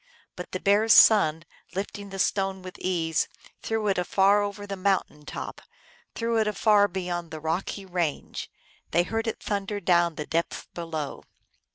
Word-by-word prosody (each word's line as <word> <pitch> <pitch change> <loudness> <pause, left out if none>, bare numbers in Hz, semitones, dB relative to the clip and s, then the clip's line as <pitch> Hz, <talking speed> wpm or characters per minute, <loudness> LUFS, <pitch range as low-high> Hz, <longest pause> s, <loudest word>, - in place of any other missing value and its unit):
But 180 - -8
the 185 - -3
Bear 205 +3 +3
s 225 - +7
son, 165 -7 +6 0.3
lifting 200 +1 -4
the 195 - -7
stone 195 -1 0
with 185 0 -9
ease, 165 -3 0 0.3
threw 220 -1 -1
it 195 -2 +2
afar 195 +3 +4
over 205 0 -4
the 200 -1 -4
mountain 185 -6 -1
top, - - -6 0.5
threw 230 0 0
it 215 - +2
afar 210 0 +4
beyond 175 -3 -4
the 160 -1 -7
rocky 170 +5 -3
range; 175 -5 -3 0.4
they 175 - +3
heard 225 +5 -2
it 225 - -4
thunder 205 0 -2
down 170 -3 +3
tho 150 - -4
depths 165 +3 -2
below. 160 -4 -5
190 Hz, 165 wpm, -26 LUFS, 170-205 Hz, 0.5 s, s